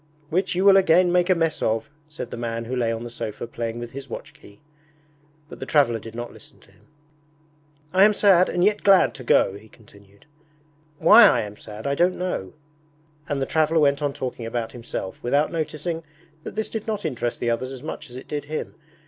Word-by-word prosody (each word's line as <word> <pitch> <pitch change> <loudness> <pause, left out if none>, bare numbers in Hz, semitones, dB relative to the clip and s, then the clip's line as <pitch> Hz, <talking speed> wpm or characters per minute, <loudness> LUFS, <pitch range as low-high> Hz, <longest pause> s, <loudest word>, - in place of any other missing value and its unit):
'Which 185 +2 0
you 185 +2 +1
will 195 -1 +8
again 180 -1 +4
make 180 +1 +2
a 185 - +5
mess 165 -2 -1
of,' 115 +6 -1 0.2
said 150 - -7
the - - -4
man 115 -1 -4
who 125 +3 -4
lay 120 -2 0
on 115 0 -4
the 120 - -7
sofa 110 -1 -5
playing 115 0 -5
with 120 0 -7
his 140 0 -9
watch - - -8
key. 100 0 -18 0.9
But - - -11
the - - -5
traveller 135 -7 +3
did 115 +1 -11
not 120 0 -6
listen - - -16
to - - -22
him. - - -27 1.1
'I 190 +2 +7
am 210 - +4
sad 190 -3 +4
and 175 - 0
yet 210 +1 +2
glad 195 -2 +5
to 130 - -10
go,' 120 - +3
he 105 +2 -13
continued. 100 -3 -20 0.7
'Why - - +8
I - - +4
am 105 -1 -7
sad 105 0 -10
I 140 - 0
don't 175 +5 +2
know.' 180 - -3 0.8
And 145 - -1
the - - -1
traveller 160 +2 +2
went 140 -1 +3
on 145 -1 0
talking 125 -4 -5
about 115 -1 -3
himself, 115 -5 -6
without 145 +5 +1
noticing 160 0 -3 0.4
that - - -8
this 220 0 -2
did 220 0 -5
not 210 -3 -3
interest 120 -5 -2
the 120 - 0
others 130 +3 -2
as 135 0 -9
much 150 -2 -7
as 120 - -11
it 130 - -9
did 145 -1 -4
him. 155 +1 -5
140 Hz, 215 wpm, -23 LUFS, 115-175 Hz, 1.1 s, will